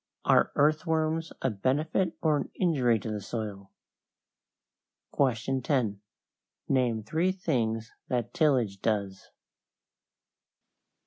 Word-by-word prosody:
Are - - +4
earthworms 160 +2 +1
a 130 - +2
benefit 150 - 0
or 155 -2 +4
an 145 - -2
injury 135 - +2
to 110 +1 -5
the 105 -1 -3
soil? 100 -2 -5 1.5
10. 125 -4 0 0.7
Name 120 -5 +1
three 165 - +1
things 115 - -1 0.2
that 120 -2 -2
tillage 125 - +2
does. 100 -3 -2
125 Hz, 90 wpm, -28 LUFS, 110-155 Hz, 1.5 s, Are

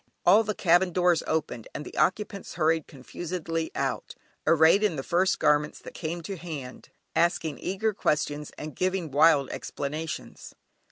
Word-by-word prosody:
All 205 +5 +7
the 215 -1 -3
cabin 175 0 +3
doors 175 -2 +3
opened, 155 -7 -2
and 150 - -5
the - - -10
occupants 200 +1 -1
hurried 160 -1 +1
confusedly 165 +4 -4
out, - - -2 0.3
arrayed 165 +5 +6
in 210 -6 +1
the 135 - -4
first 180 +5 +2
garments 150 0 +2
that - - -11
came 170 +1 -4
to 195 +3 -5
hand, 150 -7 -8 0.3
asking 165 -3 +1
eager 210 +4 -1
questions, 150 -4 -1
and 155 -1 -7
giving 185 -4 -1
wild 145 -1 +4
explanations. 155 +3 -5
165 Hz, 150 wpm, -27 LUFS, 150-185 Hz, 0.3 s, All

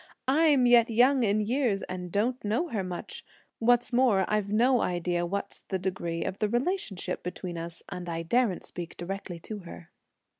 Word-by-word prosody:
I'm 285 -2 +4
yet 240 -1 +6
young 250 +4 +4
in 215 -1 +2
years 225 -2 0
and 180 -1 -6
don't 240 +6 0
know 230 +12 0
her 210 -7 -2
much; 180 -1 -6 0.4
what's 245 +1 +3
more, 240 -7 +4
I've 210 -1 0
no 245 +3 +4
idea 175 0 0
what's 200 +3 -4
the 190 - -3
degree 175 -3 -3
of 190 - -4
the 210 - +1
relationship 240 - -2
between 180 0 -5
us, 165 0 -7
and 180 -1 -6
I 165 0 -3
daren't 225 +2 +1
speak 175 -2 -7
directly 185 0 -5
to 215 +3 -6
her." 170 -2 -11
205 Hz, 175 wpm, -28 LUFS, 180-245 Hz, 0.4 s, yet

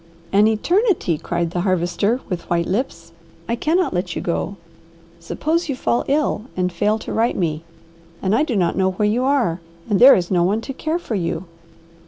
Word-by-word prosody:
"An 205 +2 +5
eternity!" 335 - +1
cried 170 -1 -2
the 175 - -1
Harvester 185 +6 0
with 180 -3 -5
white 170 -1 +1
lips. 180 -5 -3 0.4
"I 235 - 0
cannot 330 +8 +1
let 180 -1 -2
you - - -2
go. 185 +3 -2 0.6
Suppose 315 - -2
you 275 - -1
fall 240 -1 0
ill 280 -6 0
and 180 0 0
fail 210 +5 +1
to - - -6
write 230 +2 +1
me, 160 -3 -1 0.6
and 190 +1 0
I 225 - +3
do 290 -6 0
not 180 -4 +1
know 190 -1 +1
where 210 +3 +1
you 235 +4 +1
are, 250 -12 +1 0.3
and 210 -4 +1
there 260 +3 +9
is 175 0 -2
no 180 -2 +3
one 205 +5 +1
to 270 - -6
care 315 +5 -2
for 345 -9 -6
you." 175 -2 -2
205 Hz, 195 wpm, -20 LUFS, 175-255 Hz, 0.6 s, there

